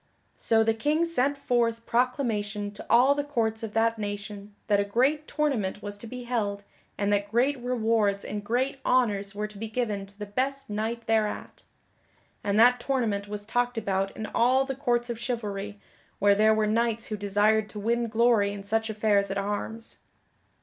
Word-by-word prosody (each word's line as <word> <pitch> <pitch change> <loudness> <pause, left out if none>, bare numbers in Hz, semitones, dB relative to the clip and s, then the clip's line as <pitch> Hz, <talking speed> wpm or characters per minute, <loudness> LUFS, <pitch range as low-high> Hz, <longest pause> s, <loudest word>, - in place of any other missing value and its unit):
So 225 -1 +3
the 225 0 +2
King 300 +9 +1
sent 285 -4 +1
forth 230 -3 0
proclamation 220 -5 -1
to 205 - -10
all 250 +4 +6
the 290 0 -2
courts 225 -6 -1
of 220 -2 -6
that 225 0 +2
nation 205 0 -6
that 205 -2 +2
a - - +3
great 265 +9 +1
tournament 230 -10 -1
was 205 0 -5
to 230 - -9
be 250 +2 -7
held 205 -5 -2 0.3
and 205 0 +1
that 205 0 0
great 250 +6 +2
rewards 225 -5 +1
and 205 0 -4
great 255 +5 -1
honors 205 -5 +1
were 210 +1 -2
to 210 -1 -10
be 225 - -4
given 215 -4 -2
to 200 +1 -20
the 210 - -5
best 265 +4 -2
knight 225 +2 -3
thereat. 220 -1 -1 0.8
And 200 +1 +1
that 245 +2 +6
tournament 230 -6 -1
was 205 0 -6
talked 245 +2 0
about 195 -3 0
in 220 - -4
all 255 +5 +2
the 270 - -3
courts 240 -3 0
of 230 - -6
chivalry 210 -4 -4 0.4
where 205 0 +4
there 215 +2 +4
were 215 0 +2
knights 230 +1 0
who 215 - -2
desired 210 +1 +2
to 210 - -7
win 235 +3 0
glory 225 -2 +3
in 200 -1 -7
such 220 +2 0
affairs 205 -2 +1
at 195 - -2
arms. 210 +3 -4
220 Hz, 185 wpm, -27 LUFS, 205-245 Hz, 0.8 s, all